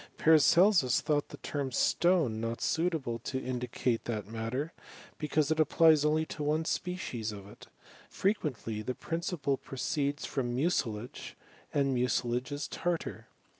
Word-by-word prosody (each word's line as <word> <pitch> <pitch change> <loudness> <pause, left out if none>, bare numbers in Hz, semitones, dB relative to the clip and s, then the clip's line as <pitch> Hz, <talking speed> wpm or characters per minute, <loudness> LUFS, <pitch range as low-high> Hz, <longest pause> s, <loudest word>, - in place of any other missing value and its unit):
Paracelsus 160 - +5
thought 150 -2 0
the - - -9
term 140 -3 -3
stone 150 -5 +2
not 115 0 -2
suiv 170 +1 +1
able 120 -6 -3
to 130 +3 -4
indicate 125 -2 -2
that 110 -4 -3
matter, 115 +8 -3 0.5
because 150 0 +1
it 160 - +1
applies 155 0 +5
oaly 155 +1 +2
(i_ 155 - -9
one 150 +2 0
species 130 - -3
of 100 -1 -9
it. 105 - -14 0.4
Frequently 130 - -1
the 125 +4 -3
principle 165 -4 -2
proceeib 140 +2 -2
from 120 -3 -2
mucilage, 125 -6 -2 0.4
and 140 -1 +1
mucilage 125 +1 0
is 145 +1 -3
tartar. 135 - -3
140 Hz, 135 wpm, -31 LUFS, 120-160 Hz, 0.5 s, Paracelsus